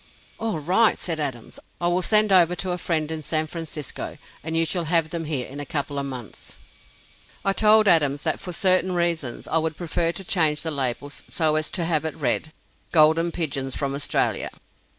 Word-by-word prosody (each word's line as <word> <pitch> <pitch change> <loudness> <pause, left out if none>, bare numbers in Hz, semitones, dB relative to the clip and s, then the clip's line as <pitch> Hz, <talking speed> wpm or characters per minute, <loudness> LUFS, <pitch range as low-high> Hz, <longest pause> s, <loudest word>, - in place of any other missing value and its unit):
"All 225 -6 -2
right," 185 +9 +3
said 165 -3 -2
Adams; 130 -6 -4 0.2
"I 175 - 0
will 175 +1 +1
send 215 +2 +4
over 180 -2 +5
to 185 +1 -2
a 180 - -2
friend 160 -2 -1
in 160 -1 -3
San 155 +1 0
Francisco, 155 -3 -6 0.3
and 160 +1 -2
you 165 - +3
shall 175 0 -1
have 165 -1 +2
them 165 -1 -3
here 145 -5 -1
in 140 +2 -9
a - - -2
couple 145 -1 -1
of 140 - -3
months." 125 -5 -9 0.9
I 195 - +3
told 215 +1 +5
Adams 145 -5 +3
that, - - 0
for 180 - -6
certain 185 +1 +3
reasons, 170 -8 -1
I 165 - +2
would 160 -1 -3
prefer 170 -1 0
to 195 - -8
change 160 -5 +2
the 160 - -2
label 140 0 -2
so 155 +2 -1
as 155 0 -1
to 175 -4 -1
have 160 -2 +1
it 160 -2 -3
read: 150 +2 0 0.4
"Golden 160 +1 +4
Pigeons 135 -6 -2
from 140 -1 -2
Australia." 140 +1 0
160 Hz, 195 wpm, -24 LUFS, 145-175 Hz, 0.9 s, over